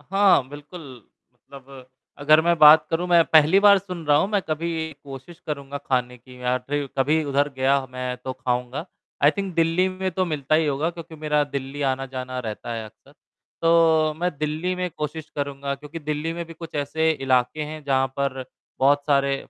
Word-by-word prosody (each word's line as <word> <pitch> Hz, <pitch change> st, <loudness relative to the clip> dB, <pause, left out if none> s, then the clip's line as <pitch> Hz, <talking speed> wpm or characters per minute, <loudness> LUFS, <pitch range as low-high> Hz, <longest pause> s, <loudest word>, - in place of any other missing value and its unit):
हाँ 190 Hz, -5 st, +3 dB
बिल्कुल, 145 Hz, +5 st, -10 dB, 0.5 s
मतलब 135 Hz, 0 st, -14 dB, 0.3 s
अगर 155 Hz, +2 st, +5 dB
मैं 170 Hz, +1 st, +2 dB
बात 155 Hz, 0 st, +8 dB
करूँ, 165 Hz, +2 st, -1 dB
मैं 170 Hz, -1 st, +5 dB
पहली 160 Hz, +5 st, +5 dB
बार 200 Hz, -1 st, +7 dB
सुन 180 Hz, -3 st, -8 dB
रहा 145 Hz, 0 st, +4 dB
हूँ। 170 Hz, -, +2 dB
मैं 205 Hz, -2 st, +2 dB
कभी 160 Hz, 0 st, -2 dB
कोशिश 140 Hz, +5 st, -10 dB
करूँगा 140 Hz, -2 st, -5 dB
ख़ाने 125 Hz, -3 st, -2 dB
की 125 Hz, +1 st, -16 dB
या 125 Hz, 0 st, +1 dB
ट्री 145 Hz, +3 st, -3 dB
कभी 150 Hz, +4 st, +2 dB
उधर 145 Hz, 0 st, +1 dB
गया 135 Hz, +1 st, +2 dB
मैं 125 Hz, 0 st, -4 dB
तो 130 Hz, -, -3 dB
खाऊँगा। 125 Hz, +3 st, -3 dB, 0.4 s
आई 145 Hz, -, +7 dB
थिंक 195 Hz, -3 st, -3 dB
दिल्ली 165 Hz, +3 st, +2 dB
में 185 Hz, 0 st, -3 dB
तो 185 Hz, +2 st, 0 dB
मिलता 155 Hz, -4 st, -1 dB
ही 160 Hz, 0 st, +3 dB
होगा 145 Hz, +3 st, 0 dB
क्योंकि 165 Hz, -1 st, -11 dB
मेरा 150 Hz, -1 st, +1 dB
दिल्ली 140 Hz, 0 st, -5 dB
आना-जाना 130 Hz, -1 st, -5 dB
रहता 115 Hz, -1 st, -5 dB
है 115 Hz, -1 st, -5 dB
अक्सर। 110 Hz, -, -17 dB, 0.5 s
तो 165 Hz, -2 st, +4 dB
मैं 180 Hz, +1 st, +1 dB
दिल्ली 155 Hz, +4 st, -2 dB
में 180 Hz, 0 st, -2 dB
कोशिश 155 Hz, 0 st, -6 dB
करूँगा 140 Hz, -1 st, -3 dB
क्योंकि 150 Hz, +4 st, -9 dB
दिल्ली 150 Hz, +1 st, -3 dB
में 170 Hz, 0 st, -5 dB
भी 165 Hz, -, -10 dB
कुछ 165 Hz, 0 st, -10 dB
ऐसे 155 Hz, +3 st, 0 dB
इलाके 135 Hz, 0 st, 0 dB
हैं 155 Hz, +1 st, -8 dB
जहाँ 135 Hz, -1 st, +2 dB
पर 135 Hz, -2 st, -2 dB, 0.3 s
बहुत 145 Hz, +2 st, +3 dB
सारे 140 Hz, -1 st, +2 dB
150 Hz, 185 wpm, -23 LUFS, 135-165 Hz, 0.5 s, बात